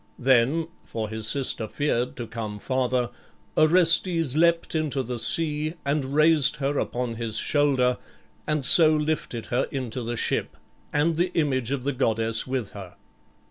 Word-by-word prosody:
Then 130 +5 +2 0.2
for 110 -2 -5
his 110 -1 -2
sister 130 -4 0
feared 125 -2 -2
to 120 - -6
come 110 -2 -6
farther 125 +1 -1 0.4
Orestes 165 -2 +3
leapt 170 +1 +2
into 150 -4 -1
the 120 0 -5
sea 155 +3 +1
and 140 -1 -2
raised 155 -2 +4
her 140 0 -2
upon 120 -2 -3
his 115 -2 -3
shoulder 135 -2 +1 0.5
and 150 -3 -1
so 155 +2 +7
lifted 150 -6 -3
her 125 - +1
into 130 -2 -5
the 120 0 -4
ship, - - -2 0.3
and 155 +2 0
the 175 +1 0
image 130 -7 0
of 135 -2 -3
the 140 +1 -1
goddess 115 -3 0
with 130 -5 -3
her. 95 -3 -11
135 Hz, 150 wpm, -24 LUFS, 120-155 Hz, 0.5 s, so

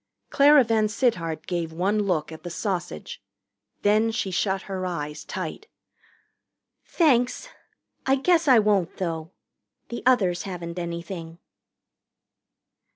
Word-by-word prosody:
Clara 285 0 +7
VanSittart 215 -7 0
gave 170 -2 -2
one 190 +6 0
look 175 -7 0
at 160 - -9
the 175 - -6
sausage. 175 - -4 0.6
Then 215 +2 +3
she 220 -3 -2
shut 190 +1 0
her 190 -2 -5
eyes 150 -4 -4
tight. 190 - -6 1.2
"Thanks 255 -8 +1 0.6
I 265 - +5
guess 330 +3 +2
I 255 -3 +7
won't, 205 -5 +2
though. 165 -3 -3 0.6
The 235 - -5
others 190 -9 +3
haven't 175 -2 -6
anything." 170 -1 -6
190 Hz, 110 wpm, -25 LUFS, 170-225 Hz, 1.2 s, Clara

